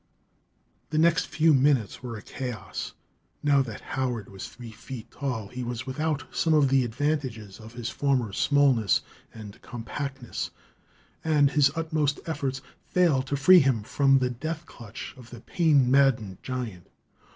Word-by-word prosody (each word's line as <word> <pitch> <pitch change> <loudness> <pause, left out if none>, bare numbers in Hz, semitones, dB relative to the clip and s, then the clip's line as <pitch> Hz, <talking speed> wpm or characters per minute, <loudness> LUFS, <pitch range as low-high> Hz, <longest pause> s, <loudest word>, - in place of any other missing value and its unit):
The 155 - -2
next 165 +1 +3
few 160 0 +3
minutes 135 -6 +2
were 120 -3 -6
a 105 - -11
chaos. 120 -8 -6 0.5
Now 145 -2 +4
that 115 -5 -5
Howard 125 -6 -2
was 95 -1 -7
three 120 -2 -11
feet 115 +1 -9
tall 125 -8 -4
he 125 +2 -6
was 120 0 -4
without 150 +3 -2
some 160 -1 +3
of 145 -3 +4
the 135 -1 +4
advantages 120 -5 -2
of 110 +1 -12
his 120 -1 -4
former 130 -7 0
smallness 135 -5 +3 0.3
and 105 -3 -11
compactness, 125 +1 -5 0.7
and 150 -3 +3
his 145 -2 +4
utmost 155 -3 0
efforts 140 -4 -3 0.3
failed 155 -8 +2
to 140 - -1
free 180 +7 +8
him 130 -7 +2
from 135 +4 +3
the 125 -1 0
death 155 +7 -5
clutch 115 -5 -9
of 120 -2 -13
the 120 -2 -10
pain 145 -7 +3
maddened 125 -9 +3
giant. 120 -9 -5
130 Hz, 150 wpm, -27 LUFS, 115-145 Hz, 0.7 s, free